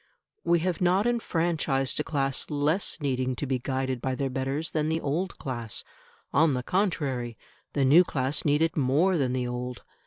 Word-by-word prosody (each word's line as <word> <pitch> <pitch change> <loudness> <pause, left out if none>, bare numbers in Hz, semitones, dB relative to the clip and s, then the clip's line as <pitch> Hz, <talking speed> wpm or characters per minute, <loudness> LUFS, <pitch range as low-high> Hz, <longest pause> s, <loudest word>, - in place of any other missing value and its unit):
We 170 -1 +3
have 180 -1 -1
not 185 +4 +3
enfranchised 165 - 0
a - - +1
class 135 -4 -1
less 150 +6 0
needing 130 -2 0
to 145 - -3
be 130 -2 -1
guided 130 -1 -2
by 130 -1 -1
their 135 0 -2
betters 135 +4 -2
than 155 -1 0
the 160 0 0
old 165 +6 -2
class; 120 -5 -4 0.5
on 155 -2 +4
the 125 - -2
contrary, 135 - -1 0.4
the 140 -2 +2
new 155 +7 +7
class 135 -3 -1
need 150 +1 +3
it 165 - 0
more 150 +7 +3
than 130 -6 +1
the 125 -1 -1
old. 125 0 -5
140 Hz, 180 wpm, -27 LUFS, 130-165 Hz, 0.5 s, new